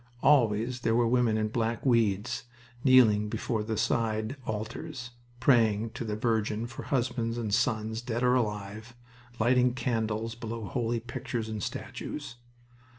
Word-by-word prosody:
Always 120 -3 +3
there 115 -2 +1
were 120 0 +4
women 120 -2 +2
in 110 0 0
black 115 +1 -1
weeds 115 -1 +1 0.4
kneeling 110 -6 +5
before 110 0 -2
the 110 0 -3
side 110 +2 0
altars, 120 +5 -5 0.3
praying 115 -4 +3
to - - -5
the 105 -2 -3
Virgin 110 0 0
for 120 0 -7
husbands 120 -4 -1
and 110 -4 -2
sons, 110 0 0
dead 120 0 -2
or 125 0 +4
alive, 110 -1 -2 0.4
lighting 125 +2 +3
candles 115 -3 -1
below 115 -1 -6
holy 120 +1 -1
pictures 115 -1 -4
and 110 -1 -4
statues. 145 +5 -6
115 Hz, 140 wpm, -29 LUFS, 110-120 Hz, 0.4 s, kneeling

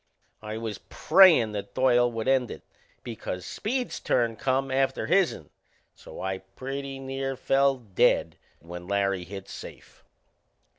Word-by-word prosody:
I 110 0 -5
was 110 -3 -5
prayin' 165 - +6
that 105 -1 -6
Doyle 125 -2 +3
would 115 +1 -4
end 130 -3 +2
it, - - -9 0.4
because 90 -6 -6
Speed's 250 +3 -3
turn 115 -2 +1
come 135 +4 -1
after 135 0 0
his'n; 185 +1 +1 0.4
so - - -12
I 95 0 -3
pretty 135 +8 -6
near 135 0 -4
fell 135 +1 +2
dead 105 -7 +1 0.2
when 90 +2 -10
Larry 100 -2 0
hit 95 +1 -8
safe. - - -11
120 Hz, 135 wpm, -27 LUFS, 100-135 Hz, 0.4 s, prayin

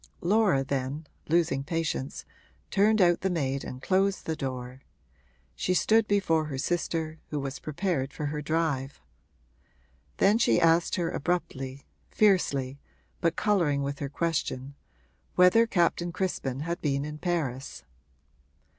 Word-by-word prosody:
Laura 190 -7 +3
then, 140 +3 -3 0.2
losing 160 -5 +2
patience, 160 -3 -3 0.5
turned 215 +2 +4
out 175 -2 +4
the 190 - 0
maid 140 -6 -1
and 130 +1 -8
closed 195 +1 +1
the 160 - -1
door; 130 -2 -5 0.7
she 180 - 0
stood 220 +4 +3
before 175 -7 +2
her 145 -3 -5
sister, 160 +1 -2
who 150 - -2
was 135 0 -4
prepared 155 -4 -2
for 150 - -5
her 150 +1 -3
drive. 150 -3 -1 1.2
Then 205 +3 +4
she 115 - +4
asked 165 +1 +3
her 170 -2 -1
abruptly, 140 -5 -3 0.2
fiercely, 140 -10 +2 0.4
but 170 0 +1
colouring 170 -10 +1
with 140 0 -3
her 140 - -3
question, 140 -4 -2 0.6
whether 180 +6 +6
Captain 175 -3 +1
Crispin 145 -8 -2
had 170 +2 -3
been 140 -1 0
in 150 0 -7
Paris. 150 -8 -3
160 Hz, 130 wpm, -28 LUFS, 135-180 Hz, 1.2 s, whether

